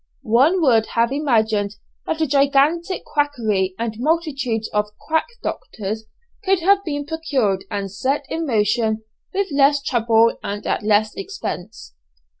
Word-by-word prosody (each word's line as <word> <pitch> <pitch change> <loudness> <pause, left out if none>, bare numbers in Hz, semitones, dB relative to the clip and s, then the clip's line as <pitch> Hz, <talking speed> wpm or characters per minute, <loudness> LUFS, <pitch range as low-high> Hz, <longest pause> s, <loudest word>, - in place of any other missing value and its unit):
One 280 +11 +3
would 230 -6 +4
have 230 +1 +3
imagined 220 -8 +1 0.3
that 320 - -2
a - - +4
gigantic 290 +6 +2
quackery 220 -11 0
and 225 -1 -3
multitudes 270 -7 0
of 210 0 0
quack 320 0 0 0.2
doctors 215 +1 -4 0.4
could 385 -2 +2
have 395 +3 +4
been 290 -4 -3
procured 275 - -1
and 200 -2 -3
set 270 +8 -1
in 325 0 -3
motion 220 -1 +1 0.3
with 395 -2 -1
less 280 +1 +4
trouble 230 -4 +2
and 205 +1 -5
at - - 0
less 215 0 +2
expense! 300 - -6
255 Hz, 135 wpm, -21 LUFS, 215-310 Hz, 0.4 s, would